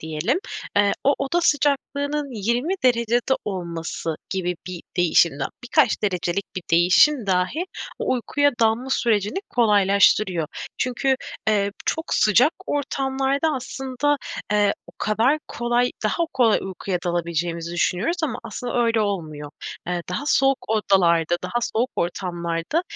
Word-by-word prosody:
diyelim, 160 Hz, -, -1 dB, 0.4 s
eee, 205 Hz, 0 st, +4 dB
o 280 Hz, -, +4 dB
oda 275 Hz, +6 st, 0 dB
sıcaklığının 290 Hz, -1 st, 0 dB
20 245 Hz, -, +1 dB
derecede 240 Hz, +1 st, +2 dB
olması 170 Hz, -4 st, -4 dB
gibi 180 Hz, -2 st, -2 dB
bir 180 Hz, -2 st, -6 dB, 0.2 s
değişim 170 Hz, -3 st, +3 dB
dah 135 Hz, -, -1 dB, 0.2 s
birkaç 245 Hz, -1 st, +2 dB
derecelik 185 Hz, -1 st, -1 dB
bir 185 Hz, -, -3 dB
değişim 185 Hz, -, +4 dB
dahi 185 Hz, -, 0 dB, 0.3 s
o -, -, 0 dB
uykuya 285 Hz, +4 st, +1 dB
dalma 225 Hz, +4 st, +2 dB
sürecini 215 Hz, -, +1 dB
kolaylaştırıyor. 200 Hz, -5 st, +3 dB, 0.3 s
Çünkü, 265 Hz, +1 st, +1 dB, 0.3 s
eee, 200 Hz, -2 st, +2 dB, 0.2 s
çok 320 Hz, -, -1 dB
sıcak 235 Hz, -, +4 dB
ortamlarda, 275 Hz, +1 st, 0 dB
aslında, 270 Hz, +2 st, -1 dB, 0.4 s
eee, 205 Hz, -1 st, +3 dB
o -, -, -15 dB
kadar 230 Hz, +8 st, +2 dB
kolay 240 Hz, +1 st, 0 dB
daha 335 Hz, +10 st, +1 dB
kolay 240 Hz, -5 st, +4 dB
uykuya 190 Hz, -1 st, -3 dB
dalabileceğimizi 170 Hz, -1 st, -2 dB
düşünüyoruz 180 Hz, -, 0 dB
ama 255 Hz, -6 st, -1 dB
aslında -, -, -7 dB, 0.2 s
öyle 230 Hz, -1 st, +2 dB
olmuyor. 155 Hz, -8 st, -3 dB, 0.4 s
Eee, 175 Hz, -1 st, -2 dB
daha 270 Hz, +11 st, -3 dB
soğuk 270 Hz, -2 st, +3 dB
odalarda, 175 Hz, -6 st, +3 dB
daha 240 Hz, -, -1 dB, 0.2 s
soğuk 240 Hz, +3 st, +1 dB
ortamlarda, 170 Hz, -, -2 dB
215 Hz, 125 wpm, -23 LUFS, 175-265 Hz, 0.4 s, eee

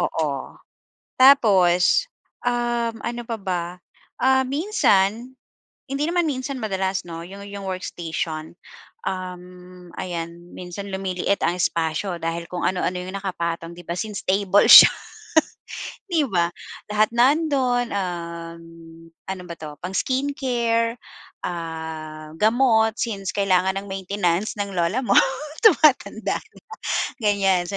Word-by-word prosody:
Oo, 150 Hz, -6 st, -2 dB, 0.6 s
tapos, 200 Hz, -, +5 dB, 0.4 s
um, 240 Hz, -1 st, 0 dB
ano 240 Hz, 0 st, -4 dB
pa 230 Hz, -, -2 dB
ba? 180 Hz, -3 st, -2 dB, 0.6 s
Ah, 265 Hz, 0 st, +4 dB
minsan, 255 Hz, -, +1 dB, 0.5 s
hindi 275 Hz, +2 st, -2 dB
naman 345 Hz, -1 st, +1 dB
minsan, 265 Hz, -1 st, -3 dB
madalas, 190 Hz, -3 st, -1 dB
'no? 165 Hz, 0 st, -7 dB
'Yong-'yong 200 Hz, +2 st, -9 dB
workstation, 165 Hz, -3 st, -4 dB, 0.6 s
um, 180 Hz, -1 st, -7 dB
ayan 170 Hz, 0 st, -6 dB
minsan 180 Hz, +3 st, -7 dB
lumiliit 190 Hz, 0 st, -1 dB
ang 170 Hz, +2 st, +1 dB
espasyo 170 Hz, +2 st, -1 dB
dahil 165 Hz, +1 st, -3 dB
kung 180 Hz, -, -4 dB
ano-ano 180 Hz, -1 st, -1 dB
'yong 185 Hz, +2 st, -6 dB
nakapatong, 170 Hz, -3 st, -3 dB
'di 175 Hz, -, -12 dB
ba? 170 Hz, -, -2 dB
Since 210 Hz, +1 st, -4 dB
table 200 Hz, +1 st, +3 dB
siya, -, -, +12 dB, 1.2 s
'di 325 Hz, -4 st, +2 dB
ba? 175 Hz, -5 st, +1 dB, 0.4 s
Lahat 210 Hz, 0 st, +3 dB
nando'n, 255 Hz, -1 st, +2 dB
um, 170 Hz, -3 st, -4 dB, 0.7 s
ano 190 Hz, -1 st, -4 dB
ba 170 Hz, -, -5 dB
'to? 150 Hz, -2 st, -8 dB
Pang-skin 260 Hz, +10 st, -1 dB
care, 230 Hz, -3 st, 0 dB, 0.5 s
ah, 160 Hz, -2 st, -6 dB
gamot, 225 Hz, -1 st, +3 dB
since 200 Hz, -5 st, -2 dB
kailangan 190 Hz, -1 st, +2 dB
ng 200 Hz, -, -12 dB
maintenance 190 Hz, 0 st, -1 dB
ng 200 Hz, -1 st, -3 dB
lola 175 Hz, +8 st, +1 dB
mo -, -, +2 dB, 0.5 s
tumatanda 310 Hz, -, +4 dB
na -, -, -21 dB, 0.6 s
ganyan, 195 Hz, -4 st, +2 dB
so, 200 Hz, -, -3 dB
190 Hz, 115 wpm, -23 LUFS, 175-235 Hz, 1.2 s, siya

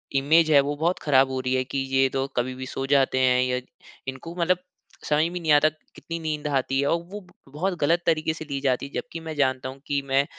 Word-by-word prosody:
Image 155 Hz, +4 st, +4 dB
है 145 Hz, -, +8 dB
वो 145 Hz, +1 st, -2 dB
बहुत 170 Hz, +4 st, 0 dB
खराब 135 Hz, -2 st, +4 dB
हो 130 Hz, -, -2 dB
रही 130 Hz, 0 st, -1 dB
है 130 Hz, -, +1 dB
कि -, -, 0 dB, 0.2 s
ये 135 Hz, 0 st, +5 dB
तो 135 Hz, 0 st, 0 dB
कभी 125 Hz, +1 st, 0 dB
भी 130 Hz, 0 st, -6 dB
सो 135 Hz, +1 st, -4 dB
जाते 135 Hz, -1 st, +2 dB
हैं 125 Hz, -1 st, +4 dB
या 125 Hz, 0 st, 0 dB, 0.5 s
इनको 135 Hz, +6 st, -6 dB
मतलब 175 Hz, +2 st, +3 dB, 0.5 s
समझ 150 Hz, +1 st, +3 dB
में 180 Hz, -, -4 dB
नहीं 160 Hz, -2 st, +1 dB
आता 150 Hz, +1 st, +5 dB, 0.3 s
कितनी 165 Hz, -, -6 dB
नींद 155 Hz, -2 st, -3 dB
आती 135 Hz, -1 st, 0 dB
हैं? -, -, 0 dB
और 165 Hz, +3 st, +1 dB
वो 205 Hz, -2 st, -8 dB, 0.3 s
बहुत 180 Hz, +5 st, -1 dB
गलत 165 Hz, +4 st, +3 dB
तरीके 160 Hz, -1 st, +2 dB
से 160 Hz, -, -7 dB
ली 140 Hz, -2 st, -3 dB
जाती 135 Hz, -1 st, 0 dB
है -, -, -17 dB
जबकि 240 Hz, -9 st, -5 dB
मैं 160 Hz, -1 st, -6 dB
जानता 130 Hz, -2 st, 0 dB
हूँ 135 Hz, +1 st, -10 dB
कि 140 Hz, -1 st, 0 dB
मैं, 135 Hz, +1 st, +3 dB
145 Hz, 245 wpm, -25 LUFS, 130-160 Hz, 0.5 s, है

